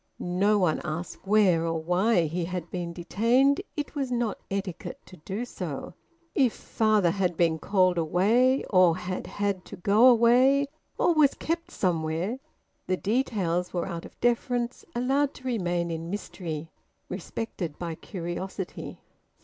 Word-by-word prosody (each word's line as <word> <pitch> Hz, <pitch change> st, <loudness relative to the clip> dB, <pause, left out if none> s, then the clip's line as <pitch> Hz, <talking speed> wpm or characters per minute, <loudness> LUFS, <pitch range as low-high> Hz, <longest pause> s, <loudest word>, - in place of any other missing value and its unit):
No 195 Hz, +4 st, +2 dB
one 180 Hz, -6 st, +1 dB
asked 165 Hz, +5 st, -5 dB
where 195 Hz, -5 st, +4 dB
or 165 Hz, -1 st, -1 dB
why 180 Hz, +5 st, +2 dB
he 165 Hz, +2 st, -2 dB
had 175 Hz, -1 st, -5 dB
been 175 Hz, -2 st, -3 dB
detained; 235 Hz, -, +2 dB, 0.2 s
it 295 Hz, -, -3 dB
was 275 Hz, -4 st, -2 dB
not 235 Hz, -4 st, -1 dB
etiquette 195 Hz, -3 st, -4 dB
to 185 Hz, -, -14 dB
do 195 Hz, +9 st, -4 dB
so. 175 Hz, -, -6 dB, 0.4 s
If 260 Hz, -6 st, +3 dB
father 215 Hz, -5 st, +2 dB
had 180 Hz, -3 st, -1 dB
been 165 Hz, -2 st, +2 dB
`called 185 Hz, -2 st, +2 dB
away,' 220 Hz, -, +3 dB
or 185 Hz, -3 st, +5 dB
had 185 Hz, 0 st, -4 dB
`had 200 Hz, -2 st, -2 dB
to -, -, -9 dB
go 205 Hz, +7 st, +5 dB
away,' 255 Hz, +4 st, +5 dB, 0.3 s
or 345 Hz, -, +3 dB
was 300 Hz, -3 st, +4 dB
`kept 335 Hz, +1 st, -3 dB
somewhere,' 175 Hz, +5 st, -1 dB, 0.5 s
the 185 Hz, -, +1 dB
details 195 Hz, -7 st, 0 dB
were 175 Hz, -, 0 dB
out 170 Hz, -3 st, -5 dB
of -, -, -14 dB
deference 240 Hz, 0 st, 0 dB
allowed 270 Hz, +4 st, +1 dB
to -, -, -13 dB
remain 175 Hz, -8 st, -1 dB
in 165 Hz, +1 st, -4 dB
mystery, 165 Hz, -5 st, -5 dB, 0.4 s
respected 180 Hz, -3 st, -5 dB
by 170 Hz, -2 st, -4 dB
curiosity 180 Hz, +2 st, -6 dB
190 Hz, 145 wpm, -27 LUFS, 175-235 Hz, 0.5 s, or